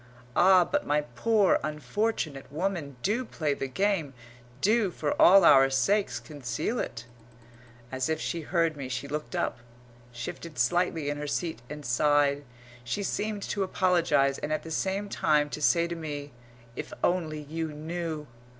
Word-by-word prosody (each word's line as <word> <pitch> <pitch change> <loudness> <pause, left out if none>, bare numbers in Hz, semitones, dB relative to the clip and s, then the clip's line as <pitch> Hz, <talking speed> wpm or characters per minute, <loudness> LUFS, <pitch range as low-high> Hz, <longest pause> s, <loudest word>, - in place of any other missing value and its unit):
Ah, 185 -1 +6
but 290 +9 -1
my 150 +1 +1
poor, 190 - +2
unfortunate 155 -2 -2
woman, 160 -3 -2
do 220 +6 +1
play 155 - -2
the 135 - -4
game 165 -2 0 0.4
do, 210 - +3
for 155 -4 -2
all 190 0 +8
our 135 -3 +7
sakes, 195 +11 +1
conceal 145 - -3
it! 115 0 -4 0.9
As 130 +2 -1
if 160 -1 0
she 170 - -3
heard 165 0 +1
me, 140 -3 -6
she 125 +2 -4
looked 145 -4 -4
up, 120 - -1 0.5
shifted 120 +6 -7
slightly 160 +3 +1
in 145 - -4
her 150 0 -4
seat 160 -4 -2
and 150 0 -7
sighed. 145 +2 +2 0.4
She 125 - -3
seemed 205 0 -2
to 205 - -2
apologise 175 -7 +2
and 150 - -4
at 155 - -1
the 160 - -8
same 195 +5 -1
time 150 -6 +1
to 150 - -5
say 170 +2 +4
to 170 - -4
me, 145 -3 -6 0.4
"If - - -6
only 160 -4 0
you 160 +2 -4
knew!" 160 0 -4
155 Hz, 160 wpm, -28 LUFS, 145-185 Hz, 0.9 s, all